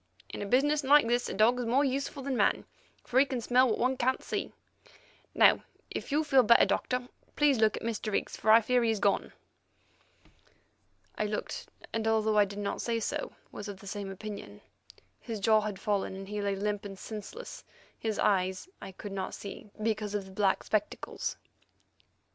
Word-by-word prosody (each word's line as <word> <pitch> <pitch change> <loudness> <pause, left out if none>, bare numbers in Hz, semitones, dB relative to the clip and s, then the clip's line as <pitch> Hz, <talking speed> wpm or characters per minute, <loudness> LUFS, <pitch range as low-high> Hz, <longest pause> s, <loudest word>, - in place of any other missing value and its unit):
In - - -6
a 205 - -3
business 290 +6 +3
like 285 -1 +6
this 240 +1 +1
a - - -3
dog 230 +5 +4
is 245 - -2
more 265 +5 +3
useful 275 +1 -2
than 270 -1 -1
man, - - +2 0.4
for 255 - +2
he 275 - +6
can 260 -2 -2
smell 250 +2 +3
what 220 - 0
one 255 +2 +1
can't 260 +2 0
see. - - -3 0.8
Now, - - +6 0.3
if - - -5
you 300 +2 +2
feel 270 -3 +5
better, 235 0 +6
Doctor, 250 -1 -1 0.3
please 290 -5 +3
look 220 -1 +3
at - - -7
Mr. 225 -1 -2
Higgs, - - -1
for 215 - -2
I 225 +1 +8
fear 250 +2 +2
he's 225 -2 +1
gone." 200 0 +1 1.9
I 215 - +1
looked, 210 0 -4 0.3
and, 225 0 -1
although 220 -1 +3
I 205 - +6
did 200 +1 -9
not 205 -1 -3
say 230 -1 -1
so, 225 - -3 0.2
was 205 - -7
of 200 -2 -7
the - - -14
same 200 0 -5
opinion. 195 - -8 0.6
His 225 -2 -5
jaw 215 +1 +4
had 210 -2 -4
fallen, 200 -2 -1
and 195 0 -8
he 210 +1 -3
lay 200 -1 0
limp 205 +1 -2
and 195 -1 -8
senseless; 220 - -8 0.4
his 220 -2 -2
eyes 190 - +1
I 190 - -8
could 205 +2 -8
not 190 -1 -4
see, 200 +1 -9
because 215 -2 -1
of 200 -2 -2
the 190 - -12
black 195 0 +1
spectacles. 210 -1 -2
215 Hz, 190 wpm, -30 LUFS, 205-250 Hz, 1.9 s, I